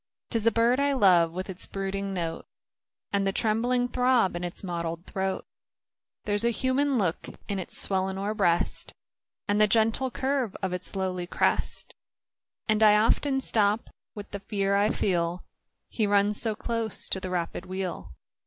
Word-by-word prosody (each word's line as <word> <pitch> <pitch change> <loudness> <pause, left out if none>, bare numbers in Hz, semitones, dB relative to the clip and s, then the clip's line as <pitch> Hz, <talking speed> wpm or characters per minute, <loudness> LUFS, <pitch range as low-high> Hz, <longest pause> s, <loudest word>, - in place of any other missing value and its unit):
'Tis 230 -2 +1
a - - +6
bird 235 +4 +3
I 280 0 +2
love, 180 -9 +5
with 185 +2 -5
its 185 -2 -5
brooding 195 0 -3
note, 170 -3 -4 0.7
And 200 -1 +1
the - - +2
trembling 240 +4 +1
throb 250 -6 +2
in 175 - -4
its 175 +2 -6
mottled 170 -1 -4
throat; 190 0 -3 0.8
There's 205 0 0
a 235 - +3
human 260 +3 +1
look 180 -6 -1 0.2
in 200 -1 -2
its 185 - -4
swellinor 190 +2 +2
breast, 175 -5 0 0.5
And 205 +1 +2
the 210 - +6
gentle 225 +4 +2
curve 260 -4 -1
of 185 -1 -1
its 180 +2 -3
lowly 185 -2 -2
crest; - - -1 0.7
And 215 -1 +2
I 210 -1 +7
often 270 +5 +2
stop 215 -3 +2 0.2
with 205 -1 -8
the 200 - -4
fear 200 -1 -1
I 205 +1 +3
feel 175 -3 0 0.2
— - - -54
He 215 -3 -1
runs 205 +1 +2
so 220 -2 -1
close 230 -1 -3
to 190 - -1
the 185 - -5
rapid 175 +1 -3
wheel. 185 - -5
200 Hz, 165 wpm, -27 LUFS, 185-225 Hz, 0.8 s, I